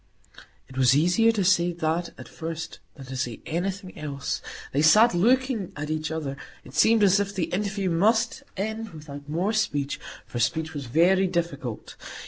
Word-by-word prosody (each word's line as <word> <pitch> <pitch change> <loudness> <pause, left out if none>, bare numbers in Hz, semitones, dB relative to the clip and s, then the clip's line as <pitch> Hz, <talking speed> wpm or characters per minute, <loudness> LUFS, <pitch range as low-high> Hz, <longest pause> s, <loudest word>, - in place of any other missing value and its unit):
It 130 0 -7
was 130 0 +5
easier 180 +9 +4
to 205 -3 0
say 175 -1 +3
that 170 +1 -1
at - - -9
first 160 0 -6 0.2
than 135 - -10
to 130 +1 -7
say 125 -3 -3
anything 185 +3 -3
else. 140 -2 -4 0.3
They 140 - +1
sat 215 +10 +6
looking 240 +2 +2
at 150 +1 -4
each 155 0 -2
other. 150 -4 -4 0.3
It 130 - -14
seemed 220 +7 +4
as 195 0 +5
if 200 0 -2
the 180 -3 -2
interview 195 -1 -1
must 220 +7 +2 0.2
end 220 +3 -3
without 145 -2 -10
more 180 +8 0
speech, 145 -10 -1 0.3
for 120 - -5
speech 160 +8 0
was 140 -4 -5
very 180 +8 +4
difficult. 155 -10 -3
170 Hz, 170 wpm, -26 LUFS, 145-200 Hz, 0.3 s, sat